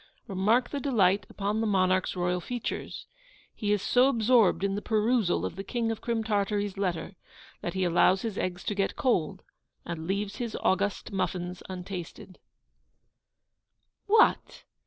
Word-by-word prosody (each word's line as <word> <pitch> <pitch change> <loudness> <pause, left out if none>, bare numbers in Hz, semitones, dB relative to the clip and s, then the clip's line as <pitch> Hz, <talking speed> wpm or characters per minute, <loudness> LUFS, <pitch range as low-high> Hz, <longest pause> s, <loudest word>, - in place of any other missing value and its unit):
Remark 220 +5 +1
the 285 - -2
delight 200 -8 +2
upon 205 +2 -2
the 225 - 0
monarch's 185 -2 +2
royal 180 0 0
features. 245 +5 -5 0.5
He 205 -1 -2
is 210 -2 +1
so 250 +1 +4
absorbed 230 -6 +3
in 200 0 +1
the 205 - -2
perusal 220 -3 +1
of - - -4
the 195 - -5
King 230 +2 -1
of 225 - -5
Crim 230 -1 -1
Tartary's 205 -1 -1
letter, 185 -1 -3 0.4
that 175 - -4
he 190 - 0
allows 180 +2 +3
his 225 -4 -3
eggs 180 -2 -3
to - - -2
get 195 -1 -1
cold, 185 - 0 0.4
and 165 -1 -5
leaves 200 +1 -2
his 235 -2 -4
august 195 +2 0
muffins 180 -2 -3
untasted. 185 0 -7 1.7
'What! 435 +2 +3
200 Hz, 150 wpm, -28 LUFS, 185-225 Hz, 1.7 s, so